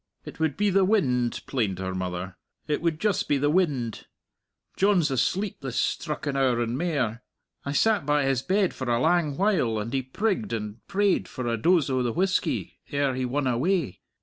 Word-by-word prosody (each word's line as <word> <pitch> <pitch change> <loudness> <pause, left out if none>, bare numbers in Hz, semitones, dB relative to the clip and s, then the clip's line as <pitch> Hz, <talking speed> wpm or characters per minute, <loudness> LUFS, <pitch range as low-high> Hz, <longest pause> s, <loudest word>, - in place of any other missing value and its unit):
"It - - -10
would 160 -3 0
be 205 0 +2
the 195 +1 +4
wind," 130 - +1
plained 110 -8 -1
her 95 0 -3
mother; 90 0 -4 0.3
"it 150 -1 0
would 165 -2 0
just 210 -1 0
be 145 - +2
the 145 +2 +1
wind. 145 - 0 0.7
John's 185 -6 +3
asleep 190 - 0
this 135 -3 -3
strucken 150 -3 -2
hour 130 -3 +2
and 120 0 -1
mair. 130 -8 -1 0.4
I 140 - -2
sat 215 +5 +3
by 145 0 +2
his 135 -2 +1
bed 190 +4 +1
for 130 -2 -4
a 120 0 +2
lang 150 0 +2
while, 180 - +2
and 110 +4 -4
he 135 - +1
prigged 205 - -2
and 105 0 -5
prayed 200 -1 +1
for 125 - -6
a 120 -1 0
dose 165 +6 +3
o' 130 -1 +1
the 120 -2 -1
whisky 185 +1 -1
ere 140 -2 0
he 130 0 -2
won 135 +3 -1
away. 130 - 0
140 Hz, 190 wpm, -26 LUFS, 120-180 Hz, 0.7 s, the